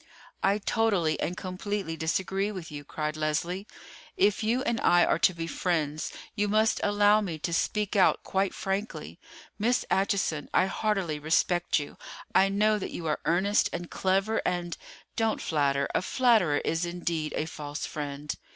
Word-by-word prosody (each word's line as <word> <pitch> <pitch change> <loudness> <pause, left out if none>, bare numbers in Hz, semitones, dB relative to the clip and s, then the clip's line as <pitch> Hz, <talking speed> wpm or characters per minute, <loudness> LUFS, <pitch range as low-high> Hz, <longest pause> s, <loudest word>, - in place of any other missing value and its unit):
"I 200 +1 +3
totally 200 -7 +1
and 180 - -2
completely 185 -1 -3
disagree 190 +5 -1
with 180 -6 -7
you," 145 -1 -7
cried 150 +1 -3
Leslie. 170 +6 -2 0.5
"If 205 +1 +3
you 235 +4 +1
and 235 -5 -1
I 175 0 +5
are - - +1
to 185 - +5
be 165 -1 -3
friends, 160 -3 -1 0.2
you 210 -1 0
must 215 +2 +2
allow 205 +1 +4
me 175 -6 -3
to 170 +2 -3
speak 210 +5 0
out 190 - +4
quite 195 0 0
frankly. 195 +2 -4 0.4
Miss 240 +4 +1
Acheson, 190 -6 0
I 185 - +5
heartily 195 -6 -1
respect 175 +3 +2
you. 145 -2 -5 0.4
I 195 +1 +5
know 210 +2 +2
that - - -4
you 170 - -6
are 155 -1 0
earnest 195 +5 +2
and 175 0 -5
clever, 195 +4 +1
and——" 175 -2 -2 0.4
"Don't 225 -1 +1
flatter; 140 -3 +1
a - - +2
flatterer 210 - +3
is 165 +2 0
indeed 170 -3 -2
a 155 - 0
false 150 -1 -5
friend." 145 -1 -4
185 Hz, 160 wpm, -28 LUFS, 160-205 Hz, 0.5 s, I